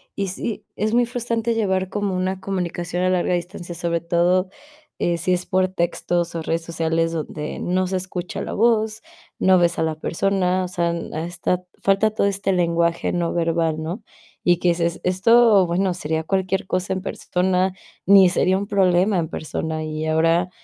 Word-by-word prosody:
Y 195 Hz, -2 st, -2 dB
sí, 210 Hz, +2 st, -5 dB
es 215 Hz, +2 st, 0 dB
muy 245 Hz, 0 st, +4 dB
frustrante 235 Hz, -1 st, -2 dB
llevar 190 Hz, -4 st, 0 dB
como 205 Hz, -3 st, -2 dB
una 185 Hz, +1 st, -1 dB
comunicación 180 Hz, -2 st, -3 dB
a 185 Hz, -, +2 dB
larga 180 Hz, 0 st, +1 dB
distancia, 175 Hz, 0 st, -4 dB
sobre 170 Hz, 0 st, -1 dB
todo, 175 Hz, +2 st, +2 dB, 0.5 s
eh, 170 Hz, -1 st, +1 dB
si 180 Hz, +3 st, 0 dB
es 180 Hz, 0 st, -1 dB
por 185 Hz, 0 st, +2 dB
textos 175 Hz, -1 st, -1 dB
o 165 Hz, -, -2 dB
redes 165 Hz, +1 st, -1 dB
sociales 165 Hz, 0 st, -1 dB
donde 155 Hz, -2 st, -5 dB
no 185 Hz, +1 st, 0 dB
se 190 Hz, -, -1 dB
escucha 180 Hz, -1 st, -5 dB
la -, -, -4 dB
voz, 220 Hz, -1 st, +2 dB, 0.4 s
no 190 Hz, 0 st, +5 dB
ves 175 Hz, -1 st, +2 dB
a -, -, +2 dB
la 160 Hz, -1 st, -1 dB
persona. 185 Hz, +2 st, 0 dB
O 180 Hz, -, -3 dB
sea, 175 Hz, -2 st, -1 dB
a 165 Hz, -1 st, -4 dB
esta 175 Hz, +1 st, -2 dB, 0.2 s
falta 195 Hz, +2 st, +3 dB
todo 210 Hz, -1 st, +1 dB
este 195 Hz, 0 st, 0 dB
lenguaje 170 Hz, -1 st, +1 dB
no 175 Hz, -1 st, -1 dB
verbal, 165 Hz, -2 st, 0 dB
¿no? 175 Hz, +8 st, -5 dB, 0.4 s
Y 175 Hz, -1 st, +4 dB
que 180 Hz, -, +2 dB
dices: 170 Hz, 0 st, 0 dB
"Esto, 205 Hz, +2 st, +5 dB
bueno, 180 Hz, +2 st, 0 dB
sería 160 Hz, -2 st, -2 dB
cualquier 190 Hz, +2 st, -1 dB
cosa 185 Hz, +1 st, -1 dB
en 190 Hz, -, -3 dB
persona, 185 Hz, 0 st, 0 dB, 0.3 s
ni 195 Hz, -2 st, +7 dB
sería 185 Hz, +1 st, +2 dB
un 200 Hz, -, -4 dB
problema 190 Hz, 0 st, +3 dB
en 165 Hz, -2 st, 0 dB
persona. 155 Hz, 0 st, -4 dB
Y 155 Hz, 0 st, -4 dB
ahora 165 Hz, +3 st, +2 dB
180 Hz, 180 wpm, -22 LUFS, 170-190 Hz, 0.5 s, ni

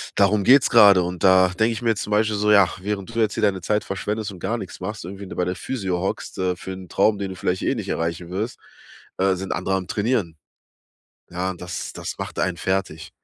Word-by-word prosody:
darum 100 Hz, +1 st, +3 dB
geht's 135 Hz, +5 st, +6 dB
grade 100 Hz, -5 st, +7 dB
und 90 Hz, 0 st, -5 dB
da 95 Hz, -1 st, +6 dB
denke 110 Hz, +5 st, +1 dB
ich 110 Hz, -, -6 dB
mir 120 Hz, -, +1 dB
jetzt 110 Hz, -3 st, 0 dB
zum 105 Hz, -, -7 dB
Beispiel 105 Hz, 0 st, +2 dB
so: 105 Hz, +1 st, +2 dB
„Ja, 100 Hz, -3 st, +7 dB
während 100 Hz, +2 st, -4 dB
du 115 Hz, -, -2 dB
jetzt 110 Hz, -2 st, +2 dB
hier 110 Hz, -, -2 dB
deine 95 Hz, -3 st, +2 dB
Zeit 105 Hz, +4 st, 0 dB
verschwendest 105 Hz, +2 st, -3 dB
und 95 Hz, -, -11 dB
gar 115 Hz, +6 st, -2 dB
nichts -, -, -8 dB
machst, 100 Hz, 0 st, -5 dB
irgendwie, 100 Hz, +2 st, -8 dB
ne, -, -, -8 dB
bei 90 Hz, -, 0 dB
der 90 Hz, +1 st, -2 dB
Physio 95 Hz, -3 st, -3 dB
hockst, 95 Hz, -, -4 dB
äh, 90 Hz, -1 st, 0 dB
für 95 Hz, -, -8 dB
'n 95 Hz, -1 st, -9 dB
Traum, 105 Hz, +4 st, +2 dB
den 100 Hz, -1 st, -4 dB
du 95 Hz, -, -7 dB
vielleicht 90 Hz, 0 st, -1 dB
eh -, -, 0 dB
nicht -, -, -5 dB
erreichen 85 Hz, +1 st, -2 dB
wirst, 105 Hz, +6 st, -4 dB, 0.6 s
äh, 95 Hz, 0 st, +2 dB
sind 95 Hz, +1 st, -5 dB
andere 95 Hz, -, -1 dB
am 95 Hz, -1 st, -3 dB
Trainieren.“ 100 Hz, -7 st, -1 dB, 0.9 s
Ja, 90 Hz, +1 st, -2 dB
das 90 Hz, -1 st, -6 dB
das -, -, -6 dB
macht -, -, -6 dB
einen 90 Hz, -2 st, 0 dB
fertig. 95 Hz, -4 st, -2 dB
95 Hz, 235 wpm, -23 LUFS, 90-105 Hz, 0.9 s, grade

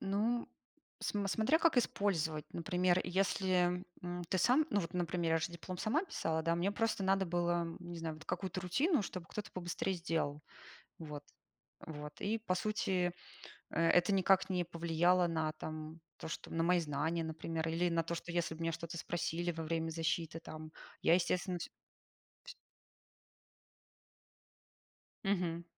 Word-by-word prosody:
Ну, 220 Hz, +5 st, 0 dB, 0.5 s
см 200 Hz, -1 st, -1 dB
смотря 225 Hz, +11 st, +3 dB
как 330 Hz, -5 st, +4 dB
использовать. 165 Hz, -10 st, +1 dB
Например, 180 Hz, +1 st, +2 dB
если, 185 Hz, -1 st, +2 dB, 0.2 s
м, 175 Hz, 0 st, -4 dB
ты 185 Hz, -, +1 dB
сам, 270 Hz, -, +5 dB
ну, 205 Hz, -, +3 dB
вот 165 Hz, -, -5 dB
например, 170 Hz, -1 st, 0 dB
я 165 Hz, -, +4 dB
же 170 Hz, +2 st, -2 dB
диплом 175 Hz, +1 st, -6 dB
сама 290 Hz, -, +1 dB
писала, 160 Hz, -, -1 dB
да, 165 Hz, +1 st, +2 dB
мне 190 Hz, +4 st, +1 dB
просто 225 Hz, -2 st, 0 dB
надо 190 Hz, 0 st, +3 dB
было, 175 Hz, 0 st, +1 dB
не 175 Hz, -1 st, -7 dB
знаю, 160 Hz, -1 st, -3 dB
вот 155 Hz, -, -12 dB
какую-то 190 Hz, -1 st, -2 dB
рутину, 265 Hz, -, +2 dB
чтобы 185 Hz, -3 st, -5 dB
кто-то 210 Hz, -, -5 dB
побыстрее 180 Hz, +1 st, -2 dB
сделал. 160 Hz, -4 st, -1 dB, 0.6 s
Вот. 150 Hz, -2 st, -6 dB, 0.8 s
Вот. 150 Hz, 0 st, -7 dB
И, 220 Hz, +3 st, +1 dB
по 185 Hz, -5 st, 0 dB
сути, 185 Hz, -3 st, +1 dB, 0.6 s
э -, -, -9 dB
это 180 Hz, +3 st, +5 dB
никак 190 Hz, 0 st, +4 dB
не 180 Hz, -2 st, +1 dB
повлияло 170 Hz, +1 st, +3 dB
на 160 Hz, -2 st, 0 dB
там 155 Hz, +1 st, -6 dB, 0.2 s
то, -, -, -6 dB
что 160 Hz, -, -6 dB
на 165 Hz, 0 st, +1 dB
мои 180 Hz, 0 st, +4 dB
знания, 160 Hz, +2 st, -1 dB
например, 160 Hz, 0 st, -3 dB
или 170 Hz, +2 st, +1 dB
на 165 Hz, 0 st, +2 dB
то, 170 Hz, +1 st, -2 dB
что 170 Hz, +1 st, -5 dB
если 170 Hz, -1 st, 0 dB
б 160 Hz, -, -12 dB
меня 165 Hz, -, +1 dB
что-то 170 Hz, +1 st, -5 dB
спросили 175 Hz, +1 st, -1 dB
во 165 Hz, 0 st, -4 dB
время 165 Hz, 0 st, -1 dB
защиты 165 Hz, 0 st, -1 dB
там, 155 Hz, -1 st, -8 dB, 0.3 s
я, 165 Hz, -, +6 dB
естественно 180 Hz, 0 st, +1 dB
всь -, -, -6 dB, 0.7 s
Всь -, -, -8 dB, 2.7 s
Мгм. 175 Hz, -4 st, 0 dB
175 Hz, 160 wpm, -35 LUFS, 165-190 Hz, 2.7 s, я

